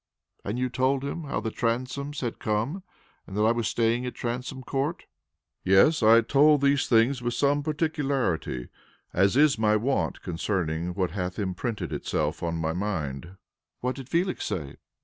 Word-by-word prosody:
"And 105 +4 -3
you 130 0 0
told 130 +2 0
him 150 +3 -4
how 140 - -2
the 110 - -3
Transomes 130 +6 -2
had 120 -3 -3
come, 110 - -1 0.5
and 95 - -7
that 105 - +2
I 110 - +5
was 115 -2 0
staying 115 +2 +1
at 125 - -6
Transome 125 +2 -4
Court?" 140 +6 -2 0.6
"Yes, 95 - +5
I 115 +1 +7
told 145 +4 +4
these 140 -1 +3
things 120 +3 +3
with 120 0 -2
some 145 +2 +2
particularity, 140 - -1 0.4
as 100 +6 +3
is 145 -5 +4
my 105 -1 +3
wont 130 +6 -1
concerning 85 -1 -2
what 95 -3 0
hath 90 -1 -3
imprinted 105 +3 -3
itself 75 +1 -2
on 85 -1 -2
my 80 0 -1
mind." 85 -4 -3 0.5
"What 125 +1 -1
did 135 -1 -9
Felix 180 +2 0
say?" 75 -6 -4
115 Hz, 165 wpm, -27 LUFS, 95-140 Hz, 0.6 s, I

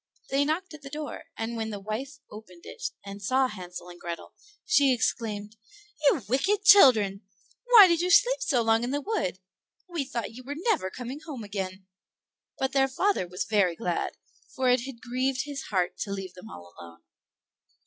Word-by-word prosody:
They 275 +1 +2
knocked 325 +4 -2
at 305 - -11
the 275 - -9
door, 300 +1 -6
and 225 +1 -3
when 220 -1 -3
the 205 -2 -5
wife 230 +8 -5
opened 185 -5 -12
it, - - -9 0.2
and 200 0 -8
saw 260 +5 +2
Hansel 180 -5 -9
and 175 0 -12
Grethel, 170 -1 -7 0.3
she 285 -11 +4
exclaimed, 215 -2 -2 0.5
"You 280 -3 +3
wicked 385 - +1
children! 220 - +7 0.4
why 475 -5 +10
did 340 -1 +2
you 360 - 0
sleep - - +5
so 265 - +1
long 225 +1 +3
in 245 - -2
the 285 +2 -1
wood? 290 - -2 0.5
We 340 -5 -2
thought 235 -3 -4
you 255 +2 -10
were 285 +3 -6
never 350 - 0
coming 250 +7 -7
home 300 -7 -8
again." 190 -2 -5 0.7
But 265 0 -1
their 270 0 +3
father 365 - 0
was 180 +2 -3
very 200 -6 +2
glad, 230 - -2 0.4
for 260 -1 +2
it 250 -1 +3
had 240 -4 -9
grieved 255 +2 -1
his 285 -2 -6
heart 185 -3 -1
to 200 - -3
leave 190 -2 -5
them 180 - -12
all 85 0 -12
alone. 85 0 -13
245 Hz, 185 wpm, -27 LUFS, 200-285 Hz, 0.7 s, why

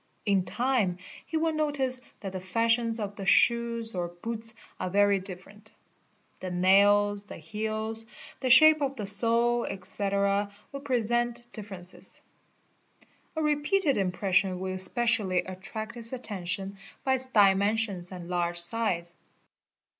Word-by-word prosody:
n 200 -3 +2
time 235 -5 0 0.3
he 320 - -2
will 320 0 0
notice 285 -4 0 0.2
that 195 -3 -5
the 190 - -5
fashions 230 +4 +1
of 205 -1 -4
the 195 - -6
shoes 235 0 +3
or 175 -2 -2
boots 225 +6 -4 0.2
are 185 - -2
very 200 +1 +3
ifferent; 195 +3 -9 0.7
the 185 - -5
nails, 200 +3 +3
the - - -10
heels, 220 +5 -3 0.3
the 260 - -2
shape 310 +4 +7
of 275 -1 -1
the 215 -5 -5
sole, 235 +3 +2
etc., 200 +1 -1 0.2
will 275 - -6
present 240 -2 -1
differences. 190 -3 -5 1.1
A 315 - -1
repeated 300 +1 +1
impression 190 0 0
will 190 0 -3
especially 190 0 +3
attract 210 +4 -6
his 235 0 +2
attention 195 -5 -3
c. 200 - -19 0.3
by 265 -1 +2
its 260 0 +2
dimensions 200 -3 +2
and 180 -2 -8
large 175 -1 -1
size. 175 -3 0
210 Hz, 130 wpm, -28 LUFS, 190-235 Hz, 1.1 s, shape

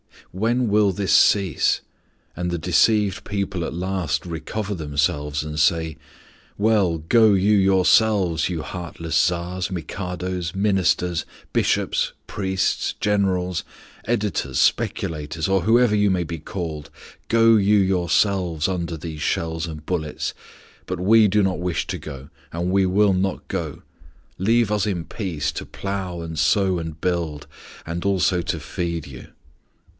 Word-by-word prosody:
When 115 +5 0
will 105 -1 +3
this 100 +1 0
cease, 95 -5 +3 0.5
and 90 0 -2
the 85 - -1
deceived 95 +4 +2
people 100 -4 -2
at - - -5
last 90 -4 -2
recover 100 +5 -4
themselves 75 -2 -1
and 75 0 -5
say: 80 +1 +1 0.6
"Well, 100 -6 +2
go 110 +6 +4
you 100 +2 +3
yourselves, 95 -3 +3
you 85 -4 -3
heartless 85 -2 -6
Tsars, 90 +1 0
Mikados, 90 -1 -4
Ministers, 95 -4 +1 0.3
Bishops, - - +1
priests, 95 -2 -1
generals, 95 -4 0 0.4
editors, 65 -2 -1
speculators, 75 0 0
or 95 -2 +2
however 115 -1 +4
you 105 -1 +3
may 90 -2 +1
be 85 0 -6
called, 80 -2 -6 0.4
go 115 0 +5
you 105 +1 +4
yourselves 90 -3 +1
under 85 -3 -3
these 80 -1 -7
shells 80 +1 -1
and 75 -2 -8
bullets, 80 -4 -3 0.5
but 90 -1 -3
we 110 +4 +5
do 105 +1 +2
not 95 -2 0
wish 90 -1 -1
to - - -4
go 70 -2 -9 0.2
and 85 +2 -1
we 95 0 +3
will 100 +2 +3
not 95 0 -1
go. - - -4 0.6
Leave 115 +3 +2
us 105 -1 +1
in 90 -5 -2
peace, 90 -9 -3
to - - -6
plough, 95 -3 -4
and 80 -2 -5
sow, 95 +3 +2
and 80 -2 -7
build, 85 -5 -2 0.4
and 85 +1 -4
also 95 -2 +2
to - - -3
feed 85 -2 -4
you." 65 -2 -11
90 Hz, 140 wpm, -22 LUFS, 80-100 Hz, 0.6 s, go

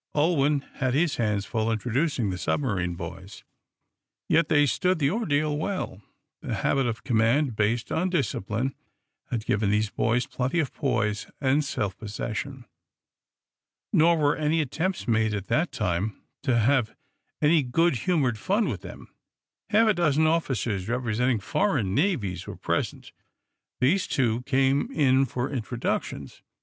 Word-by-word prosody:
Ulwin 150 -2 +2 0.2
had 130 0 0
his 155 0 +1
hands 105 -3 0
full 110 -1 -1
introducing 125 - 0
the 90 - -5
submarine 95 - -1
boys. 90 +3 -8 0.8
Yet 165 -1 +3
they 145 -1 +5
stood 180 +6 +1
the 140 -2 +1
ordeal 155 -9 0
well. 155 - -3 0.4
The - - -3
habit 135 -2 +1
of 115 -1 -4
command, 120 +3 +2
based 110 +3 0
on 180 +3 +1
discipline, 130 - -1 0.6
had 115 -2 -3
given 100 0 +1
these 105 +1 +1
boys 120 +2 +1
plenty 130 +7 -1
of 150 -5 -1
poise 105 -6 -1
and 140 +2 +2
self 100 -8 -2
possession. 115 +4 -5 1.3
Nor 165 +2 +5
were 145 -1 +2
any 155 +1 +1
attempts 165 +5 -2
made, 110 -2 +2
at 100 -1 -6
that 165 +3 +1
time, 90 +4 -2 0.2
to 130 -4 +1
have 120 0 +2 0.4
any 155 +1 +4
good 145 +3 +2
humored 130 - 0
fun 205 - +1
with - - -4
them. - - -10 0.6
Half 220 +1 +4
a - - +5
dozen 160 -4 +2
officers 120 - 0
representing 120 0 0
foreign 120 - 0
navies 110 - 0
were - - -6
present. - - -3 0.7
These, 160 +10 +2
too, 120 -3 +1
came 135 - +2
in 135 - +3
for 125 +3 -3
introductions. 125 -2 -3
130 Hz, 140 wpm, -26 LUFS, 110-155 Hz, 1.3 s, they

